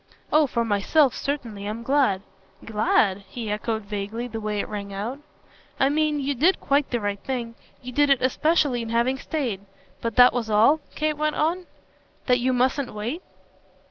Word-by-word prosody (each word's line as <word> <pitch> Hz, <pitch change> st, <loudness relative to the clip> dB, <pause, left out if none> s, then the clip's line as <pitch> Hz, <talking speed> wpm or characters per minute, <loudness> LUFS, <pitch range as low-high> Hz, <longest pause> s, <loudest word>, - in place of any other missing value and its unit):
"Oh 305 Hz, -1 st, +5 dB
for 235 Hz, -2 st, -1 dB
myself 230 Hz, +7 st, +3 dB
certainly 230 Hz, -8 st, -4 dB
I'm 220 Hz, +2 st, -5 dB
glad." 255 Hz, -7 st, +2 dB, 0.4 s
"'Glad'?" 210 Hz, -2 st, +2 dB
he 225 Hz, -4 st, -5 dB
echoed 220 Hz, +1 st, -2 dB
vaguely 205 Hz, +3 st, -4 dB
the 225 Hz, -2 st, -6 dB
way 210 Hz, -1 st, -2 dB
it -, -, -2 dB
rang 200 Hz, -1 st, -6 dB
out. 215 Hz, +8 st, -4 dB, 0.6 s
"I 270 Hz, -, +4 dB
mean 305 Hz, 0 st, +1 dB
you 280 Hz, +1 st, -1 dB
did 325 Hz, +9 st, +3 dB
quite 280 Hz, 0 st, +1 dB
the 240 Hz, -, -1 dB
right 205 Hz, -1 st, -2 dB
thing. 240 Hz, -2 st, -4 dB, 0.3 s
You 250 Hz, -, -6 dB
did 290 Hz, +3 st, +3 dB
it 275 Hz, -2 st, +4 dB
especially 285 Hz, -1 st, +2 dB
in 230 Hz, -, -5 dB
having 240 Hz, +3 st, +1 dB
stayed. 250 Hz, -13 st, -3 dB, 0.4 s
But 230 Hz, -1 st, -3 dB
that 250 Hz, 0 st, +7 dB
was 235 Hz, -3 st, -2 dB
all?" 225 Hz, +9 st, +5 dB, 0.2 s
Kate 305 Hz, -1 st, -1 dB
went 305 Hz, 0 st, 0 dB
on. 345 Hz, +4 st, 0 dB, 0.6 s
"That 250 Hz, -1 st, +3 dB
you 255 Hz, +2 st, +1 dB
mustn't 255 Hz, 0 st, 0 dB
wait?" 235 Hz, -, -4 dB
245 Hz, 175 wpm, -24 LUFS, 215-285 Hz, 0.6 s, that